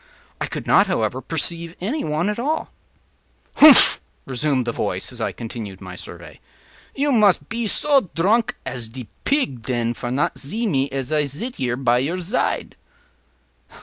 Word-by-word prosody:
I - - -2
could - - -6
not, - - +4
however, - - -1
perceive 170 0 -1
any 250 - -2
one 155 +4 -1
at 210 +2 -2
all. 300 +6 -2 0.9
“Humph!” 295 -4 +8 0.2
resumed 130 0 -1
the 120 - -1
voice, - - -3
as - - -9
I - - -1
continued 110 -4 -7
my 95 -2 -9
survey, - - -10 0.6
“you 285 +1 +1
mus 210 -6 +5
pe 230 0 -4
so 275 - +3
dronk 215 +8 +2
as 120 -3 -4
de 125 -1 -9 0.2
pig, 265 - 0
den, 120 -1 -1
for 120 - -6
not 130 +4 -1
zee 215 - -1
me 140 -9 0
as 135 +1 -4
I 150 -1 +2
zit 170 - -5
here 125 -2 -1
at 120 +1 +5
your 170 +6 -2
zide. 180 +7 -1
155 Hz, 165 wpm, -21 LUFS, -, 0.9 s, Humph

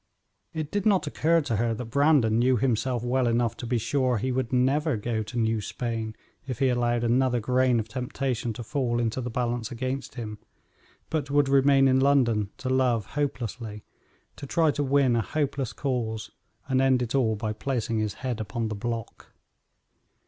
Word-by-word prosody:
It 155 -2 -4
did 205 0 0
not 195 -6 +3
occur 165 +3 +2
to 115 -7 -2
her 115 +1 0
that 125 - -5
Brandon 140 -5 +4
knew 125 +1 +3
himself 125 0 0
well 125 +1 +1
enough 115 -1 +1
to 120 - -6
be 120 0 +1
sure 130 +1 +1
he 130 +5 -1
would 130 -2 -1
never 135 +2 +2
go 110 +1 -2
to 110 +3 -6
New 110 -1 +1
Spain 115 0 -4 0.3
if 130 -4 -3
he 135 +1 +2
allowed 120 -1 +1
another 125 +1 +2
grain 125 +1 +2
of 110 - -3
temptation 125 0 -2
to 120 - -7
fall 125 -2 -1
into 120 +2 -1
the 125 - -4
balance 120 -1 -2
against 130 +3 -4
him, 105 -4 -6 0.7
but 150 -4 -1
would 145 0 +3
remain 135 0 +5
in 130 0 +4
London 125 -7 +3
to 130 - -6
love 130 -4 +2
hopelessly, 120 -6 -3 0.5
to 140 - -7
try 160 +1 +3
to 145 - -1
win 135 -3 +3
a 115 - +2
hopeless 140 +1 -2
cause, 115 -5 -3 0.4
and 130 0 +2
end 130 -2 +3
it 115 - -4
all 120 -5 +2
by 110 0 -3
placing 115 -2 -2
his 105 -1 -2
head 125 -3 -2
upon 110 +1 -3
the - - -3
block. 115 +1 -5
125 Hz, 185 wpm, -26 LUFS, 115-135 Hz, 0.7 s, remain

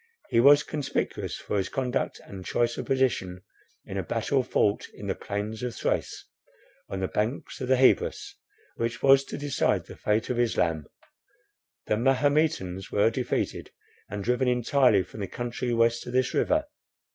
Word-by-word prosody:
He 115 - +3
was 145 +4 +7
conspicuous 145 -3 -3
for - - -3
his 95 - -2
conduct 130 0 -2
and 95 -2 -9
choice 120 +5 0
of - - -5
position 120 -9 0 0.4
in - - -6
a - - -2
battle 135 -2 0
fought 105 -4 +1
in - - -9
the - - 0
plains 105 +2 -5
of 125 -2 -3
Thrace, - - -2 0.6
on 95 -1 -4
the 95 - 0
banks 110 +9 -3
of 130 - -2
the 130 - +4
Hebrus, 130 0 +2 0.4
which 115 0 -3
was 135 0 +6
to - - -6
decide 145 -1 0
the - - -11
fate 105 +3 0
of 120 - -1
Islam. 85 -10 +1 1.0
The 105 - +1
Mahometans 130 - +1
were 105 +2 +3
defeated, 125 +1 -2 0.4
and 100 0 -4
driven 125 +3 +1
entirely 125 -4 +3
from 95 - -12
the 100 - -3
country 120 +4 -3
west 115 +1 +2
of 120 - -6
this 130 0 +1
river. 305 +1 +2
120 Hz, 165 wpm, -27 LUFS, 105-130 Hz, 1.0 s, was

